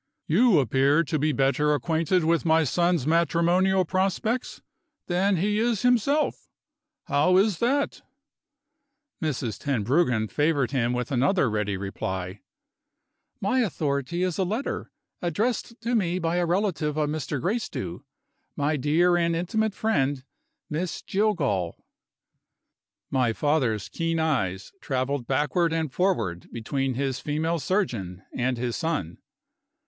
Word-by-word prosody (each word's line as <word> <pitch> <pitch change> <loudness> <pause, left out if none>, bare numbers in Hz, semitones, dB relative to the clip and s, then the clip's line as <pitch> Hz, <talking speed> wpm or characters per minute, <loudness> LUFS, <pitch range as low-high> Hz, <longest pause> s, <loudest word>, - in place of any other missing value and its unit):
"You 205 +4 +4
appear 140 +4 +3
to 155 -1 -2
be 155 +2 +2
better 145 +2 +2
acquainted 165 +3 +1
with 165 +1 +2
my 160 -1 +4
son's 170 0 +1
matrimonial 170 +4 +2
prospects 195 +7 -1 0.4
than 190 +3 +1
he 205 +4 +1
is 230 -2 0
himself. 250 +5 +2 0.6
How 155 +6 +3
is 195 -2 +2
that?" 275 +4 0 1.2
Mrs. 130 - -2
Tenbruggen 125 -2 +1
favored 145 0 +1
him 125 -3 +1
with 125 +1 -3
another 140 - +2
ready 105 -2 -1
reply: 95 -1 -4 1.0
"My 225 +7 +1
authority 155 - -1
is 185 -1 -1
a - - +3
letter, 220 +9 -3 0.3
addressed 225 +7 -1
to 235 +2 -2
me 185 -6 +1
by 165 -1 -1
a 175 -1 +1
relative 170 -5 0
of 150 -1 +1
Mr. 150 -2 -3
Gracedieu 175 - -3 0.5
my 150 +2 0
dear 165 +6 +3
and 170 -1 +1
intimate 215 +5 -1
friend, 145 -11 0 0.4
Miss 160 +3 -3
Jillgall." 145 - 0 1.4
My 125 -4 +2
father's 130 -7 0
keen 165 0 -2
eyes 115 - -1
traveled 130 -2 -2
backward 150 +5 +1
and 160 -4 -2
forward 115 - -1
between 130 +3 -2
his 135 0 -1
female 160 +3 -1
surgeon 115 - -2
and 125 0 -1
his 120 -1 -2
son. 160 - -2
155 Hz, 125 wpm, -26 LUFS, 130-185 Hz, 1.4 s, You